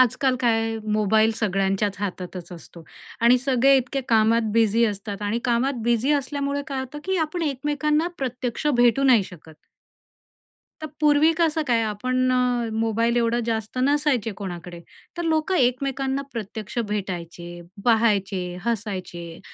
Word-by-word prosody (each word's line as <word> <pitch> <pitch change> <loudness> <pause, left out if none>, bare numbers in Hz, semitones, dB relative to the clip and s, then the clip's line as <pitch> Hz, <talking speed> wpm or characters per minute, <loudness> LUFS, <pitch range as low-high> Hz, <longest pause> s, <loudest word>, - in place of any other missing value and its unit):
आजकाल 255 +1 +3
काय 225 -2 +1 0.2
मोबाईल 215 +1 +3
सगळ्यांच्याच 195 -1 0
हातातच 180 -3 -5
असतो 170 0 -12 0.4
आणि 240 +2 +5
सगळे 265 +1 +3
इतके 265 +1 -1
कामात 225 +1 +4
बिझी 225 +1 +3
असतात 205 -1 -5
आणि 205 +3 -1
कामात 245 +1 0
बिझी 240 +4 +2
असल्यामुळे 285 0 -1
काय 275 -3 -3
होतं, 265 +3 -7
की 380 0 0
आपण 320 +2 -2
एकमेकांना 295 +2 0
प्रत्यक्ष 255 +1 -3
भेटू 240 +2 +4
नाही 255 -6 +5
शकत. 160 -3 -13 1.3
तर 310 - -4
पूर्वी 300 +2 +5
कसं 325 -2 +2
काय 235 -2 +3
आपण 255 +4 0
अ, 245 -2 +1
मोबाईल 225 +1 +1
एवढं 235 0 +1
जास्त 220 0 -3
नसायचे 280 -6 +1
कोणाकडे, 175 -3 -7 0.4
तर 345 - -2
लोकं 320 +3 +1
एकमेकांना 270 0 0
प्रत्यक्ष 220 -1 -6
भेटायचे, 175 -3 -5 0.2
पहायचे, 215 -5 +2 0.2
हसायचे 185 -7 -4
235 Hz, 130 wpm, -23 LUFS, 205-270 Hz, 1.3 s, आणि